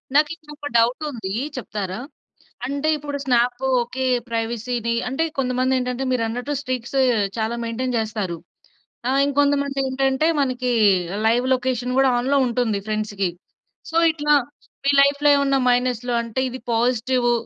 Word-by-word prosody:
నాకు 295 +1 +5
ఇంకొక 295 -3 -9
డౌటుందీ 235 -3 0 0.2
చెప్తారా? 205 -4 -4 0.7
అంటే, 280 +3 -2
ఇప్పుడు 290 -1 -5
స్నాప్పు 245 0 +1 0.2
ఓకే. 255 +2 -4 0.2
ప్రైవసీ‌ని 235 +1 -2 0.2
అంటే, 270 +5 -1 0.2
కొంతమందేంటంటే, 255 0 0
మీరన్నట్టు 245 +3 -2
స్ట్రీక్స్ 255 -2 -4 0.4
చాలా 220 +1 -1
మెయింటెయిన్ 245 +2 -2
చేస్తారు. 210 -6 -2 0.7
ఆహ్, 270 +1 +2
ఇంకొంతమందేంటంటే, 280 0 +1
మనకీ 255 -2 -1 0.6
లైవ్ 240 +3 +2
లొకేషన్ 250 -1 -1
గూడా 270 0 +5
ఆన్‌‌లో 270 +3 +1
ఉంటుంది 235 -4 0
ఫ్రెండ్స్‌కి. 210 -3 -1 0.6
సో, 325 - -7 0.2
ఇట్లా 295 -1 +1 0.5
మీ 280 - +4
లైఫ్‌లో 285 +1 +3
ఏవన్నా 275 -1 +2
మైనస్లు 245 -1 +1
అంటే, 230 +2 -3
ఇది 255 - -7
పాజిటివు 240 +1 +1
250 Hz, 115 wpm, -22 LUFS, 235-275 Hz, 0.7 s, నాకు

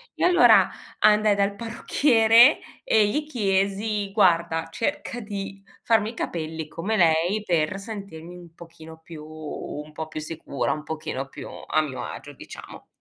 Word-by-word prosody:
e - - 0
allora 355 -1 +6 0.3
andai 210 -1 +4
dal 200 0 0
parrucchiere 230 +2 +4 0.2
e 215 -2 +3
gli 300 +7 -1
chiesi: 200 -3 -1
“Guarda, 170 -5 +2
cerca 245 - -3
di 195 -1 -7 0.2
farmi 220 -2 +2
i - - -15
capelli 160 -4 -4
come 210 +8 -3
lei.” 170 +4 +2
Per 170 +2 0
sentirmi 195 -5 -9
un 170 -2 -14
pochino 160 -1 -13
più 160 -2 -11
un 155 -1 -8
po' 160 +1 -5
più 155 - -6
sicura, 150 -5 -3
un 150 -1 -7
pochino 145 -3 -5
più - - -9 0.2
a 155 - +2
mio 140 -4 -5
agio, - - -8
diciamo - - -12
190 Hz, 150 wpm, -24 LUFS, 160-215 Hz, 0.3 s, allora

